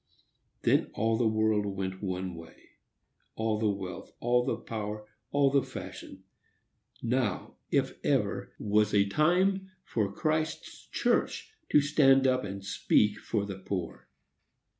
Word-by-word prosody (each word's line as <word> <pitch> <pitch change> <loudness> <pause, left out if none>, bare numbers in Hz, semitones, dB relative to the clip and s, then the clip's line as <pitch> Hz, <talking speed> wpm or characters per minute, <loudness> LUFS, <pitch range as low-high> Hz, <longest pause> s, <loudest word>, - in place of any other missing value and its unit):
Then - - +3
all 115 +1 +2
the 115 0 +2
world 110 -1 +2
went 95 -1 -4
one 95 -2 -3
way,—all 105 +6 -7
the 110 -1 +2
wealth, 95 -2 -5
all 120 +1 +2
the - - 0
power, 105 -1 -5 0.2
all 140 -1 +3
the 140 0 +4
fashion. 95 -5 -9 0.8
Now, 120 -5 -1
if - - 0
ever, - - 0
was 105 0 +2
a 100 -1 +5
time 185 - +2
for 105 -4 -1
Christ's 155 +8 -2
church 440 - 0 0.2
to 150 - +6
stand 135 -2 +4
up 130 -1 +3
and 100 0 -6
speak 105 +1 +2
for 105 -2 -1
the 100 -1 -6
poor. 95 -3 -5
110 Hz, 130 wpm, -29 LUFS, 100-135 Hz, 0.8 s, to